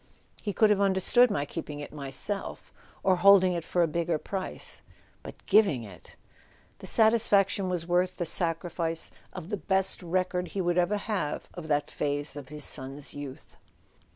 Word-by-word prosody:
"He 210 Hz, -, -2 dB
could 215 Hz, +1 st, +4 dB
have 200 Hz, -1 st, +2 dB
understood 200 Hz, +6 st, +4 dB
my 145 Hz, -8 st, -1 dB
keeping 150 Hz, -1 st, -6 dB
it 145 Hz, -, -8 dB
myself—or 180 Hz, +5 st, -3 dB
holding 190 Hz, 0 st, +6 dB
it 170 Hz, -2 st, -3 dB
for 175 Hz, +1 st, +1 dB
a -, -, +2 dB
bigger 170 Hz, +1 st, -1 dB
price—but 190 Hz, +4 st, -8 dB
giving 195 Hz, -, +4 dB
it 95 Hz, -6 st, -13 dB, 0.3 s
!" -, -, -32 dB
The -, -, -8 dB
satisfaction 205 Hz, -4 st, +3 dB
was 175 Hz, -2 st, -2 dB
worth 180 Hz, +1 st, +1 dB
the 175 Hz, -, -2 dB
sacrifice 165 Hz, 0 st, -1 dB, 0.2 s
of 180 Hz, -2 st, -8 dB
the 205 Hz, -, -2 dB
best 190 Hz, 0 st, 0 dB
record 180 Hz, +1 st, -1 dB
he 195 Hz, -, -5 dB
would 175 Hz, -1 st, +1 dB
ever 180 Hz, +4 st, +1 dB
have 195 Hz, -8 st, -3 dB
of 175 Hz, -3 st, -8 dB
that 145 Hz, -1 st, 0 dB
phase 145 Hz, 0 st, -2 dB
of 145 Hz, -3 st, -9 dB
his 150 Hz, 0 st, -2 dB
son's 135 Hz, +1 st, -1 dB
youth. 145 Hz, -2 st, -9 dB
175 Hz, 160 wpm, -28 LUFS, 150-195 Hz, 0.3 s, holding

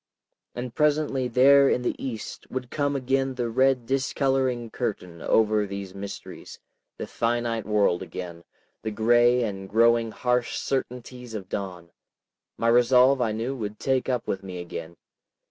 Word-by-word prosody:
And 120 Hz, -1 st, -5 dB
presently, 150 Hz, -3 st, +1 dB
there 135 Hz, +3 st, +6 dB
in 125 Hz, -, +1 dB
the -, -, 0 dB
east, 115 Hz, -5 st, -6 dB
would 125 Hz, -1 st, -5 dB
come 145 Hz, -1 st, 0 dB
again 135 Hz, 0 st, 0 dB
the 120 Hz, -2 st, -2 dB
red 130 Hz, 0 st, +2 dB
discoloring 130 Hz, -2 st, 0 dB
curtain 90 Hz, -8 st, -4 dB
over 110 Hz, -1 st, +2 dB
these 100 Hz, -1 st, -6 dB
mysteries, 100 Hz, 0 st, -8 dB, 0.4 s
the -, -, -4 dB
finite 115 Hz, -2 st, -1 dB
world 105 Hz, -5 st, +2 dB
again, 85 Hz, -2 st, -7 dB, 0.4 s
the 110 Hz, -, -3 dB
gray 120 Hz, +3 st, +3 dB
and 95 Hz, -3 st, -5 dB
growing 115 Hz, +1 st, +3 dB
harsh 125 Hz, +1 st, 0 dB
certainties 125 Hz, -2 st, -4 dB
of 95 Hz, -3 st, -7 dB
dawn. 90 Hz, -4 st, -5 dB, 0.7 s
My 115 Hz, -, 0 dB
resolve 125 Hz, +2 st, +5 dB
I 115 Hz, -3 st, +1 dB
knew 115 Hz, +5 st, -3 dB
would 105 Hz, -4 st, -5 dB
take 135 Hz, -1 st, 0 dB
up 125 Hz, -2 st, -1 dB
with 95 Hz, -, -2 dB
me 95 Hz, -2 st, -7 dB
again. 85 Hz, -1 st, -7 dB
120 Hz, 145 wpm, -25 LUFS, 105-130 Hz, 0.7 s, there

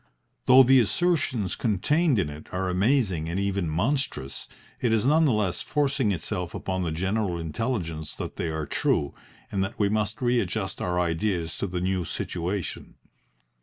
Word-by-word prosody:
Though 130 Hz, +1 st, +9 dB
the 130 Hz, +1 st, +6 dB
assertions 125 Hz, -, +1 dB
contained 130 Hz, -, +2 dB
in 90 Hz, -6 st, +1 dB
it 75 Hz, +1 st, -10 dB
are 95 Hz, 0 st, -1 dB
amazing 95 Hz, -, +1 dB
and 90 Hz, +3 st, -1 dB
even 100 Hz, -3 st, 0 dB
monstrous, 90 Hz, -, -2 dB, 0.3 s
it 120 Hz, -, +1 dB
is 110 Hz, 0 st, +2 dB
none 155 Hz, +4 st, +5 dB
the 140 Hz, -, +4 dB
less 105 Hz, -5 st, 0 dB
forcing 140 Hz, -6 st, +1 dB
itself 90 Hz, -1 st, -3 dB
upon 95 Hz, -1 st, -2 dB
the 85 Hz, -3 st, -1 dB
general 95 Hz, +2 st, -1 dB
intelligence 80 Hz, -, -3 dB
that -, -, -6 dB
they -, -, -2 dB
are 80 Hz, -1 st, -2 dB
true, 70 Hz, 0 st, 0 dB, 0.4 s
and 95 Hz, -1 st, 0 dB
that 95 Hz, +4 st, -5 dB
we 100 Hz, -1 st, +2 dB
must 105 Hz, +1 st, -1 dB
readjust 110 Hz, -6 st, 0 dB
our 90 Hz, 0 st, 0 dB
ideas 85 Hz, 0 st, -1 dB
to 100 Hz, -, -1 dB
the 90 Hz, -1 st, -3 dB
new 95 Hz, 0 st, 0 dB
situation. 85 Hz, +4 st, -4 dB
95 Hz, 165 wpm, -26 LUFS, 85-120 Hz, 0.4 s, Though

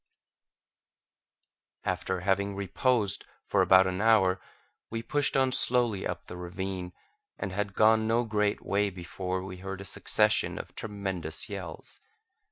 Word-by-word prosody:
After 95 Hz, -1 st, -2 dB
having 100 Hz, +1 st, 0 dB
reposed 100 Hz, +2 st, +1 dB, 0.2 s
for -, -, +2 dB
about 95 Hz, 0 st, +6 dB
an 95 Hz, +1 st, -2 dB
hour, 95 Hz, -5 st, +4 dB, 0.5 s
we 115 Hz, 0 st, -4 dB
pushed 145 Hz, 0 st, +1 dB
on 130 Hz, -1 st, +3 dB
slowly 120 Hz, -6 st, +4 dB
up 90 Hz, 0 st, -5 dB
the -, -, -9 dB
ravine, 90 Hz, 0 st, -5 dB, 0.4 s
and 95 Hz, -, -4 dB
had 100 Hz, +1 st, -3 dB
gone 110 Hz, 0 st, +4 dB
no 115 Hz, +2 st, +2 dB
great 105 Hz, -2 st, -1 dB
way 100 Hz, +1 st, +1 dB
before 95 Hz, 0 st, -4 dB
we 95 Hz, -1 st, -7 dB
heard 95 Hz, +1 st, -6 dB
a 100 Hz, -, -8 dB
succession -, -, +2 dB
of -, -, -8 dB
tremendous 95 Hz, -7 st, -4 dB
yells. 95 Hz, -6 st, -8 dB
100 Hz, 135 wpm, -29 LUFS, 95-110 Hz, 0.5 s, about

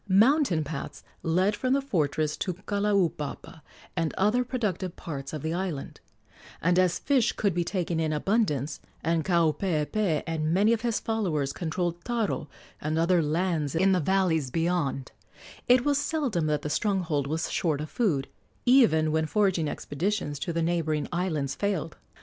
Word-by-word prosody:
Mountain 210 Hz, -, +4 dB
paths 145 Hz, -1 st, -6 dB, 0.2 s
led 185 Hz, +5 st, +2 dB
from 255 Hz, +4 st, 0 dB
the 275 Hz, -, +3 dB
fortress 155 Hz, -, 0 dB
to 185 Hz, -3 st, -3 dB
Kalaupapa 195 Hz, -6 st, -1 dB, 0.3 s
and 165 Hz, -3 st, -1 dB
other 210 Hz, +6 st, +3 dB
productive 210 Hz, -8 st, -2 dB
parts 140 Hz, -4 st, -6 dB
of 155 Hz, -3 st, -5 dB
the 160 Hz, +1 st, -1 dB
island; 175 Hz, -6 st, -4 dB, 0.6 s
and 180 Hz, +2 st, +2 dB
as 180 Hz, -2 st, +3 dB
fish 260 Hz, -5 st, +2 dB
could 200 Hz, -3 st, 0 dB
be 175 Hz, +1 st, 0 dB
taken 175 Hz, -2 st, -2 dB
in 160 Hz, -1 st, 0 dB
abundance, 150 Hz, -, 0 dB, 0.2 s
and 165 Hz, 0 st, +1 dB
Kaupeepee 170 Hz, +1 st, +1 dB
and 160 Hz, -1 st, -1 dB
many 205 Hz, +6 st, +4 dB
of 225 Hz, -, -1 dB
his 235 Hz, -2 st, 0 dB
followers 175 Hz, -11 st, -1 dB
controlled 175 Hz, 0 st, -3 dB
taro 230 Hz, -10 st, -2 dB, 0.3 s
and 155 Hz, +1 st, -1 dB
other 170 Hz, +1 st, +3 dB
lands 160 Hz, -1 st, 0 dB
in 190 Hz, +4 st, +4 dB
the 185 Hz, -, +3 dB
valleys 170 Hz, -5 st, +1 dB
beyond, 165 Hz, -4 st, -1 dB, 0.6 s
it 250 Hz, 0 st, +5 dB
was 290 Hz, -1 st, +3 dB
seldom 260 Hz, -, 0 dB
that 150 Hz, -1 st, 0 dB
the 150 Hz, -, -2 dB
stronghold 165 Hz, -7 st, 0 dB
was 160 Hz, +3 st, -2 dB
short 155 Hz, -5 st, 0 dB
of 150 Hz, -, -4 dB
food, 160 Hz, -, 0 dB, 0.4 s
even 225 Hz, -, +5 dB
when 160 Hz, 0 st, +1 dB
foraging 190 Hz, -5 st, +1 dB
expeditions 145 Hz, 0 st, -2 dB
to 170 Hz, -, -2 dB
the 165 Hz, 0 st, 0 dB
neighboring 160 Hz, -3 st, 0 dB
islands 160 Hz, -6 st, -1 dB
failed. 190 Hz, -6 st, -2 dB
170 Hz, 155 wpm, -27 LUFS, 155-200 Hz, 0.6 s, it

